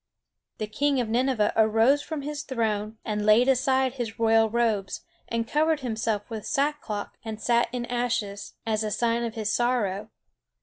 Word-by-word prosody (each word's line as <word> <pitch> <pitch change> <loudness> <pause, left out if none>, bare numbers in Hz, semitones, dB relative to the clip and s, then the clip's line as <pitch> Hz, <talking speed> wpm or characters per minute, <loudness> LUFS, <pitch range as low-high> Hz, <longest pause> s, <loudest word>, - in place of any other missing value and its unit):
The 215 - -2
king 275 +6 0
of 240 - 0
Nineveh 240 -2 +1
arose 225 +6 +4
from 295 -1 -5
his 295 +1 -4
throne, 220 -6 -2
and 210 -1 -2
laid 215 +4 +5
aside 265 0 +2
his 235 -4 -5
royal 225 -1 +4
robes, 220 -4 0 0.3
and 230 0 -2
covered 310 +1 +1
himself 220 -4 -2
with 220 -2 -6
sack 295 +1 0
cloth 205 -2 -4
and 220 -1 -6
sat 235 +2 +2
in 245 -2 -3
ashes, 235 -5 -2
as 220 -1 0
a 215 - -1
sign 235 +2 0
of 230 0 -4
his 220 -1 -1
sorrow. 215 -4 0
230 Hz, 170 wpm, -26 LUFS, 215-255 Hz, 0.3 s, laid